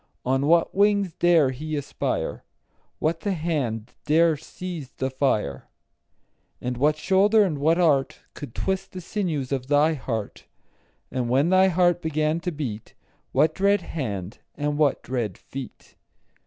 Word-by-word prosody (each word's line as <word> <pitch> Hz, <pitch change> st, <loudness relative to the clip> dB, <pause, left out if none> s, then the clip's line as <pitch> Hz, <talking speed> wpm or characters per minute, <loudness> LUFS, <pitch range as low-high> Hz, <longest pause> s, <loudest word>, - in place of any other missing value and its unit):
On 135 Hz, +2 st, +1 dB
what 170 Hz, +1 st, +3 dB
wings 200 Hz, -3 st, +2 dB
dare 165 Hz, -6 st, +4 dB
he 155 Hz, +4 st, -5 dB
aspire? 145 Hz, -2 st, -3 dB, 0.5 s
What 165 Hz, +1 st, 0 dB
the 200 Hz, +3 st, -1 dB
hand 135 Hz, -, -2 dB
dare 160 Hz, +1 st, +4 dB
seize 160 Hz, -1 st, -7 dB
the 130 Hz, 0 st, -3 dB
fire? 130 Hz, -, -1 dB, 0.9 s
And 125 Hz, 0 st, -3 dB
what 150 Hz, +5 st, +2 dB
shoulder 205 Hz, +6 st, +4 dB
and 160 Hz, -7 st, -1 dB
what 160 Hz, +4 st, +3 dB
art 150 Hz, -7 st, +2 dB
Could 140 Hz, -6 st, -9 dB
twist 190 Hz, 0 st, -2 dB
the 185 Hz, -, -5 dB
sinews 165 Hz, -9 st, -2 dB
of 130 Hz, -2 st, -2 dB
thy 150 Hz, +3 st, +4 dB
heart? 115 Hz, -7 st, -5 dB, 0.7 s
10 -, -, -3 dB
And 120 Hz, -1 st, -1 dB
when 135 Hz, +6 st, +3 dB
thy 185 Hz, +1 st, +5 dB
heart 175 Hz, -1 st, +2 dB
began 155 Hz, 0 st, 0 dB
to 180 Hz, +1 st, -3 dB
beat, 125 Hz, -9 st, -6 dB, 0.4 s
What 155 Hz, +1 st, +3 dB
dread 200 Hz, +2 st, +2 dB
hand 105 Hz, -, -5 dB, 0.2 s
and 145 Hz, 0 st, -1 dB
what 145 Hz, -3 st, +2 dB
dread 120 Hz, -7 st, -3 dB
feet? 135 Hz, -3 st, -9 dB
155 Hz, 150 wpm, -25 LUFS, 130-175 Hz, 0.9 s, thy